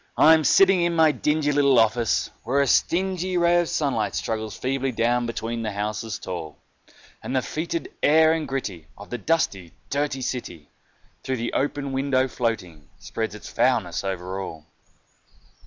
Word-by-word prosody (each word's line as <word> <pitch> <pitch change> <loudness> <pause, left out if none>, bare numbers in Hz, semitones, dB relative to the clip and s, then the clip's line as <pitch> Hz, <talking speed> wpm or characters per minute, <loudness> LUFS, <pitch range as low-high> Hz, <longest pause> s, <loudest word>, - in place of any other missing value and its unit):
I 160 - +7
am 160 -1 +3
sitting 190 +2 +5
in 170 0 +1
my 160 -1 +5
dingy 150 0 0
little 140 -2 +4
office, 115 0 +2
where 130 +4 +1
a 140 - +4
stingy 185 +5 +1
Ray 175 0 +4
of 170 - -4
sunlight 115 -9 -1
struggles 110 -1 -3
feebly 135 +1 -1
down 120 +1 +1
between 115 0 -4
the 110 -2 -3
houses 105 +2 -3
tall, 85 -5 -7 0.6
And 130 - -4
the 130 - +1
foetid 165 +2 -4
air 160 +2 +5
and 160 -1 -2
gritty 100 -12 -4
of 100 - -12
the 120 - -3
dusty, 100 - -1 0.2
dirty 140 -2 -1
city, 90 - -5 0.5
Through 130 0 -2
the 120 0 -3
open 140 0 -1
window 135 -1 +1
floating, 95 - -4
spreads 110 -1 -4
its 105 - -10
foulness - - +1
over 95 0 -4
all. 80 -5 -8
125 Hz, 160 wpm, -24 LUFS, 105-150 Hz, 0.6 s, I